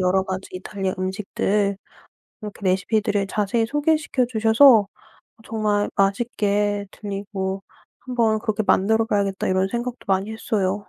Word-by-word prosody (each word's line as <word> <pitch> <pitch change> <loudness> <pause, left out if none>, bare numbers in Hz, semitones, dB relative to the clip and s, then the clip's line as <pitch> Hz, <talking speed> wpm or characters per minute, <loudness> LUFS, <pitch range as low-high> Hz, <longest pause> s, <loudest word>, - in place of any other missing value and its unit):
여러 185 +1 +2
가지 190 0 -5
이탈리아 190 +1 -4
음식들 200 +1 -1 0.7
이렇게 210 -1 -8
레시피들을 200 +2 +1
자세히 215 +3 0
소개시켜 295 -1 +1
주셔서 225 -1 +5 0.6
정말 210 -2 0
맛있게 205 0 0
들리고 195 -1 -5 0.4
'한번 230 -4 0
그렇게 215 -1 -1
만들어 220 +4 +3
봐야겠다.' 200 -3 -1
이런 190 +1 +2
생각도 240 +3 -4
많이 195 +2 0
했어요. 205 -4 -1
205 Hz, 325 characters per minute, -22 LUFS, 195-225 Hz, 0.7 s, 주셔서